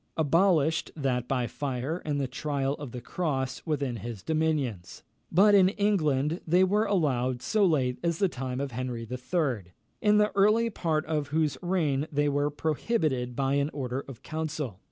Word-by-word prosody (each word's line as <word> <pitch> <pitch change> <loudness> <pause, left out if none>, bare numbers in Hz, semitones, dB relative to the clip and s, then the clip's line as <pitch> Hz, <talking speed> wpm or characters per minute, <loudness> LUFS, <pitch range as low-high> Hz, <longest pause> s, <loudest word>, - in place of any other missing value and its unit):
abolished 160 0 +3
that 130 -5 -1
by 125 -3 0
fire 135 +5 -3
and 145 -2 -1
the 135 - -1
trial 135 +1 -2
of 145 -4 -7
the 125 - -6
cross 135 -4 -2
within 140 -6 -1
his 110 -3 -7
dominions; 150 - -1 0.3
but 205 +5 +6
in 190 -2 +6
England 165 -7 +1
they 175 +3 +4
were 205 +3 +2
allowed 130 -9 +1
so 215 - +1
late 135 -9 +2
as 170 -1 0
the 195 - +3
time 130 -5 -4
of 140 -1 -3
Henry 120 -1 -4
III., 125 - -2 0.3
in 210 -1 +4
the 210 0 +3
early 215 +4 +4
part 160 -6 -1
of 150 -3 -1
whose 155 0 0
reign 160 -6 0
they 145 0 +1
were 145 0 +1
prohibited 150 - -1
by 135 +1 0
an 140 +1 +1
order 130 -2 -3
of 135 -2 -11
council. 150 - -4
145 Hz, 170 wpm, -28 LUFS, 130-170 Hz, 0.3 s, but